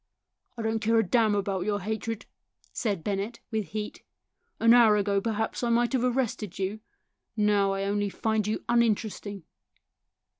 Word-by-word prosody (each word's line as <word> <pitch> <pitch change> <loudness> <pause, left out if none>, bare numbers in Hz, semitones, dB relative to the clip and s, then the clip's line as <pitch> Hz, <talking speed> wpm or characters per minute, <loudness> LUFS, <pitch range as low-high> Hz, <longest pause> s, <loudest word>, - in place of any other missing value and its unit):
" 250 - -48
I 230 - -4
don't 220 0 0
care 225 +2 +2
a 225 - +5
damn 220 +1 +2
about 195 -2 -1
your 205 +1 0
hatred," 220 +2 -4 0.5
said 200 -8 -2
Bennett, 205 +3 -3
with 220 -2 -1
heat. 210 0 -5 0.3
" - - -49
An 230 +1 +6
hour 225 -3 +6
ago, 200 -1 +1
perhaps, 220 0 -2
I 240 - 0
might 240 +2 +2
have 255 -2 +1
arrested 240 -6 -1
you; 195 +3 -2 0.6
now 205 -2 +3
I 195 0 -2
only 205 0 0
find 220 +1 -1
you 215 - -2
uninteresting." 215 -4 0
215 Hz, 165 wpm, -27 LUFS, 200-230 Hz, 0.6 s, An